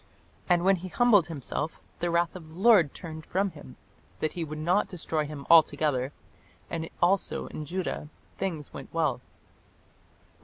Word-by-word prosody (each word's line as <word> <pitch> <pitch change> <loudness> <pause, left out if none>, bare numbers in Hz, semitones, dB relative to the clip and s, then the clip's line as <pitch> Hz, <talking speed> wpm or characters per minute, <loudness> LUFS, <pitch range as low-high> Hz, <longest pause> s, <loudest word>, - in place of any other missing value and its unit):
"And 175 0 +3
when 195 0 +5
he 180 +2 -7
humbled 210 -3 +4
himself, 155 0 -4 0.2
the 175 - 0
wrath 170 +1 +1
of 170 -4 -9
the 160 - -13
Lord 195 -9 +6
turned 160 -2 -8
from 195 +4 0
him, 65 - -12 0.4
that 155 - -1
he 175 - -3
would 155 -1 -6
not 175 +6 +2
destroy 160 -4 -2
him 145 -2 -8
altogether: 150 -5 +4 0.6
and 165 -1 -3
also 190 +2 +2
in 155 - -6
Judah 175 -2 -3 0.3
things 165 -7 -4
went - - -9
well." - - 0
165 Hz, 155 wpm, -28 LUFS, 155-185 Hz, 0.6 s, Lord